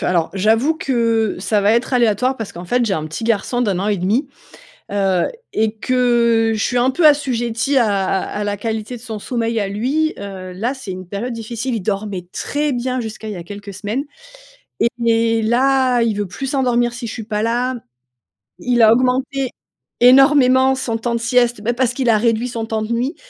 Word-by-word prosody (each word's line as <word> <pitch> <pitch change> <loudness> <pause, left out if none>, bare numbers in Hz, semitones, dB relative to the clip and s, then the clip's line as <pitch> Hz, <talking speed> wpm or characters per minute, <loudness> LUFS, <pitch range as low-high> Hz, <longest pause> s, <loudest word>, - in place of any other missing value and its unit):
Alors, 170 -3 +1
j'avoue 225 +10 +2
que 230 -7 0
ça 205 +2 0
va 205 +2 +3
être 235 +3 0
aléatoire 245 +2 +2
parce 225 -4 -6
qu'en 175 +1 -8
fait, 245 +6 +1
j'ai 200 - 0
un 155 -2 -3
petit 165 +8 -6
garçon 230 +2 0
d'1,5 210 - +1
ans. 200 - 0 0.6
Heu, 195 -3 +1 0.3
et 220 0 0
que 235 -2 +2
je 215 - -1
suis 245 - 0
un 250 +2 +3
peu 325 +5 +1
assujettie 260 -2 +1
à 215 -5 +3
à 190 +2 -2
à - - -1
la 205 0 -1
qualité 220 +3 -4
de 230 - -16
son 225 -3 -6
sommeil 230 0 -2
à 200 - -1
lui. 270 +10 0
Heu, 190 -2 -7
là 230 +8 -2
c'est 260 -8 -7
une 185 0 -8
période 205 +6 -4
difficile. 235 +2 -4
Il 220 - -3
dormait 195 -2 -3
très 295 0 -2
bien 255 0 -2
jusqu'à 220 -1 -6
il 215 - -4
y - - -7
a 170 - -7
quelques 200 +2 -9
semaines. 215 +8 -3 1.0
Et 230 0 +2
là, 255 +1 +2
il 225 -3 0
veut 205 -1 -2
plus 205 +9 -6
s'endormir 245 -3 +1
si 240 -1 -6
je 220 - -5
suis 225 - -6
pas 210 -1 -2
là. 245 +3 0 0.8
Il 245 -2 +1
a 220 0 +7
augmenté 260 +2 0 0.5
énormément 265 0 +6
son 260 -4 -3
temps 235 +1 -2
de 235 - 0
sieste, 240 -1 +2
bah, 235 +3 0
parce 245 0 0
qu'il 250 -2 0
a 220 - +5
réduit 230 +2 +1
son 230 -2 -4
temps 220 -1 -2
de 215 +2 -2
nuit. 250 +7 -1
230 Hz, 200 wpm, -19 LUFS, 210-250 Hz, 1.0 s, a